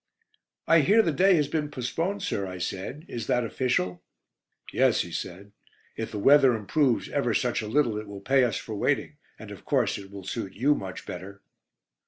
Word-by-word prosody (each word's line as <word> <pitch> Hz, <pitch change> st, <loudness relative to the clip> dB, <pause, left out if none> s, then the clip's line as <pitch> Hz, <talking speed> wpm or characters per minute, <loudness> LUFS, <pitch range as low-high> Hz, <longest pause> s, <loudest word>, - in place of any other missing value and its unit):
"I 165 Hz, -, +5 dB
hear 205 Hz, +10 st, +5 dB
'The 165 Hz, -, +1 dB
Day' 185 Hz, +6 st, +4 dB
has 150 Hz, -3 st, +2 dB
been 150 Hz, 0 st, -2 dB
postponed, 165 Hz, +9 st, -3 dB
sir," 100 Hz, -, -2 dB
I 90 Hz, 0 st, -6 dB
said. 100 Hz, -, -5 dB
"Is 115 Hz, -3 st, -5 dB
that 125 Hz, 0 st, +2 dB
official?" 115 Hz, -7 st, -1 dB, 0.7 s
"Yes," -, -, +3 dB
he 85 Hz, -, -6 dB
said. 90 Hz, +4 st, -6 dB, 0.4 s
"If 115 Hz, -, -4 dB
the 105 Hz, -, -6 dB
weather 135 Hz, +3 st, +6 dB
improves 120 Hz, +3 st, +1 dB
ever -, -, 0 dB
such -, -, 0 dB
a 110 Hz, -, -5 dB
little 115 Hz, -3 st, +1 dB
it 105 Hz, -, -8 dB
will 100 Hz, -1 st, -8 dB
pay 135 Hz, +4 st, +3 dB
us 120 Hz, -, 0 dB
for 110 Hz, -, -7 dB
waiting, 100 Hz, -, -1 dB, 0.2 s
and -, -, -10 dB
of -, -, -10 dB
course -, -, +1 dB
it 100 Hz, -1 st, -11 dB
will 100 Hz, -1 st, -9 dB
suit 95 Hz, +1 st, -5 dB
you 135 Hz, +7 st, +3 dB
much 95 Hz, -9 st, -6 dB
better?" 100 Hz, +3 st, -8 dB
115 Hz, 195 wpm, -27 LUFS, 100-145 Hz, 0.7 s, weather